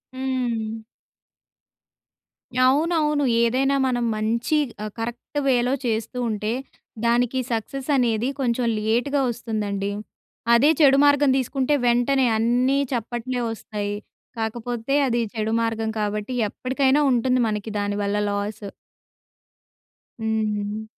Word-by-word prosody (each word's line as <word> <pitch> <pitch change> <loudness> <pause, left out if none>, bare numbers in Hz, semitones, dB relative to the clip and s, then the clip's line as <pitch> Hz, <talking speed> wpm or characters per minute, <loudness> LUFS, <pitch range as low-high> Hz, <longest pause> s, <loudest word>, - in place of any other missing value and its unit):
హ్మ్. 235 -4 -2 1.8
అవునవును. 300 0 +2 0.2
ఏదైనా 265 +4 +2
మనం 245 -1 0
మంచి 230 +7 0 0.3
ఆహ్, 215 - -5
కరెక్ట్‌ 240 +5 -4
వేలో 250 0 +2
చేస్తూ 225 +1 -2
ఉంటే 210 0 -2 0.5
దానికి 245 +2 +2
సక్సెస్ 255 +5 -3
అనేది 235 -1 +1
కొంచెం 245 -2 0
లేట్‌గా 245 +6 +1
వస్తుందండి. 210 -4 -3 0.6
అదే 265 +6 +5
చెడు 275 -2 +6
మార్గం 285 -1 +4
తీసుకుంటే 265 +2 0
వెంటనే 250 +3 +3
అన్నీ 245 +4 +2 0.2
చప్పట్లే 240 +2 -3
వస్తాయి. 205 -2 -4 0.4
కాకపోతే 235 +3 -3
అది 240 -1 +1
చెడు 220 0 -2
మార్గం 225 -1 -1
కాబట్టి 210 +3 -2 0.2
ఎప్పటికైనా 265 +4 +1
ఉంటుంది 250 +1 +2
మనకి 210 0 -3
దాని 205 0 -1
వల్ల 200 0 -1
లాస్. 205 +1 -3 1.6
హ్మ్. 220 0 0
హ్మ్. 205 +1 -4
235 Hz, 105 wpm, -23 LUFS, 220-260 Hz, 1.8 s, చెడు